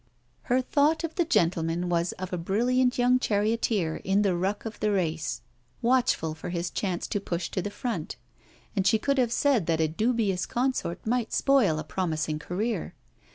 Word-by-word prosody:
Her 250 +1 +3
thought 295 +5 +2
of 325 -1 -3
the 345 - +1
gentleman 170 - +1
was 170 0 +1
of 185 0 -7
a - - 0
brilliant 245 +8 +1
young 250 +1 +4
charioteer 210 -6 0
in 195 +2 +1
the 190 -3 +2
ruck 195 +5 -2
of 225 - -6
the 210 - +1
race, 165 -5 -1 0.4
watchful 240 -10 +2
for 160 - -7
his 175 -1 -2
chance 185 -4 -2
to 205 - -2
push 175 -3 -3
to 185 - -1
the 205 - -3
front; 230 +3 -4 0.6
and 195 -2 +1
she 220 - +5
could 275 +4 0
have 240 -2 +2
said 245 - +2
that 165 -1 +1
a 160 - +3
dubious 210 +1 0
consort 250 -8 -1
might 235 0 0
spoil 255 - +3
a 155 - -3
promising 155 -3 -2
career. 205 +9 -3
200 Hz, 180 wpm, -27 LUFS, 175-245 Hz, 0.6 s, she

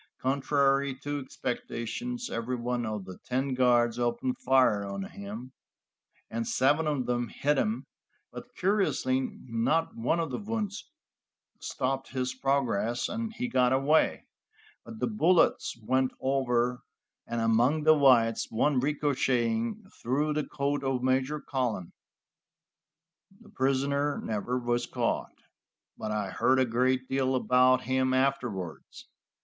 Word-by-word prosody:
Contrary 140 0 +1
to 145 +2 -4
expectations, 130 - -4
every 115 +2 -2
one 120 -1 -2
of 105 -3 -4
the 95 -1 -10
ten 130 +2 -1
guards 120 -2 +3
opened 120 +1 0
fire 130 -6 +3
on 100 -1 -4
him, 105 +7 -8 0.8
and 115 0 -3
seven 150 +4 +2
of 145 -4 0
them 120 -1 -1
hit 145 +5 0
him, 215 +2 -1 0.5
but - - -9
curiously 185 -9 +1 0.3
not 130 +8 0
one 125 +9 0
of 165 -4 -2
the - - -3
wounds 210 0 -4 0.7
stopped 135 0 -2
his 130 -1 -2
progress, 130 -4 0
and 225 +1 -4
he 245 +2 -3
got 125 - +2
away; 135 +4 +2 0.6
but 225 - -10
the - - 0
bullets 185 - +2
went 130 +1 +2
over 125 -2 0 0.5
and 120 0 -2
among 120 +7 +2
the 155 +1 +7
whites, 125 -6 +4
one 130 +4 +2
ricocheting 130 - 0 0.2
through 145 +5 0
the 150 0 0
coat 140 0 -2
of 130 -2 -1
Major 130 +3 +1
Cullen. 125 - -3 1.5
The 230 - -17
prisoner 140 +2 0
never 110 +3 -2
was 120 -1 -1
caught, - - -2 0.6
but 110 - -5
I 105 -3 -2
heard 130 - +2
a 130 - +4
great 130 +2 +1
deal 130 -1 0
about 125 0 +4
him 130 +1 +1
afterwards. 120 - -2
130 Hz, 130 wpm, -29 LUFS, 120-140 Hz, 1.5 s, the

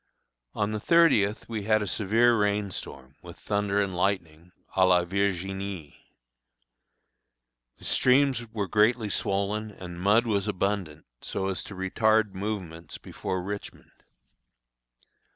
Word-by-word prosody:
On 105 0 0
the 110 - -2
thirtieth 115 -9 +3
we 110 -3 -4
had 110 -1 +3
a - - -5
severe 115 +5 +3
rain 105 -2 0
storm, 70 -4 -8
with 85 -1 -11
thunder 100 -1 -1
and 100 -2 -1
lightning, 90 -3 -2 0.2
à 95 -1 +4
la 90 -1 +4
Virginie. 95 -3 -3 1.8
The - - -17
streams 130 -2 +3
were 105 -3 -2
greatly 110 +3 +2
swollen, 100 +3 -1
and 90 -4 -9
mud 105 +5 +4
was 100 -3 0
abundant, 95 -6 -2 0.2
so 95 0 -3
as 95 - -3
to 100 - -9
retard 110 +2 +1
movements 95 -5 -5
before 95 -1 -5
Richmond. 100 +2 -7
100 Hz, 125 wpm, -27 LUFS, 95-110 Hz, 1.8 s, à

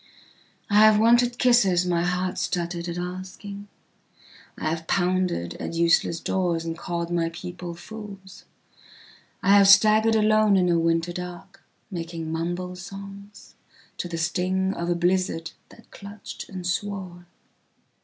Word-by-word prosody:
I 205 - +2
have 215 0 +7
wanted 240 +2 +4
kisses 195 -9 +4
my 170 -1 +1
heart 180 +1 -1
stuttered 170 0 -2
at 170 - -4
asking,I 185 0 -9
have 160 0 -3
pounded 180 - 0
at - - -5
useless 170 0 +2
doors 175 -3 -1
and 165 0 -3
called 170 0 -4
my 170 -1 0
people 175 0 -7
fools.I 195 0 -6
have 200 -1 +6
staggered 215 +3 +6
alone 215 -1 +4
in 180 -1 +2
a 170 -1 +3
winter 165 +1 0
dark 180 +2 -8 0.3
making 165 -2 -5
mumble 175 +3 -3
songsto 195 +2 -11 0.6
the 170 - -4
sting 185 +3 0
of 170 -2 -4
a 175 - +2
blizzard 175 -1 0 0.2
that - - -19
clutched 200 +1 -9
and 185 -2 -7
swore. 180 -1 -4
180 Hz, 125 wpm, -25 LUFS, 170-200 Hz, 0.6 s, have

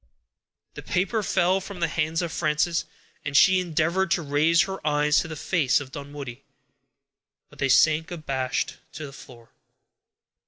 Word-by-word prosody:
_ - - -52 0.7
The - - -8
paper 195 +5 0
fell 185 -1 +1
from 195 -1 -9
the 170 - +1
hands 160 +1 -1
of 170 - -3
Frances, 165 +1 0 0.4
and 140 0 0
she 190 -1 +6
endeavored 170 +2 0
to 170 0 +1
raise 155 +3 +3
her 190 +2 -5
eyes 150 0 +3
to - - -2
the 160 - -6
face 150 -3 +1
of 135 -2 -9
Dunwoodie, 140 -3 -8 1.1
but - - -18
they 135 - +1
sank 155 +4 +4
abashed 135 -6 -3 0.2
to 155 - -6
the 135 - -10
floor. 120 -4 -14
155 Hz, 160 wpm, -25 LUFS, 145-175 Hz, 1.1 s, she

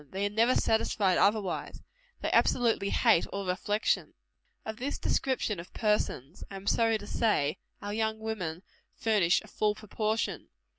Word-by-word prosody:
They 195 +2 -2
are 205 - -1
never 230 +4 +3
satisfied 205 -4 +2
otherwise. 205 -3 0 0.4
They - - -1
absolutely 225 -5 +2
hate 170 - +3
all 200 0 -5
reflection. 205 +4 0 0.5
Of 220 0 -5
this 270 +4 -3
description 245 -7 0
of 170 - -10
persons 210 - -1
I 195 - -8
am 195 0 -8
sorry 225 +1 +3
to 205 - -10
say 205 -10 +1
it - - -15 0.3
our 205 0 -4
young 220 0 0
women 190 -6 -4 0.3
furnish 205 -6 +2
a - - -14
full 210 -1 0
proportion. 215 +1 -2
210 Hz, 155 wpm, -30 LUFS, 190-220 Hz, 0.5 s, never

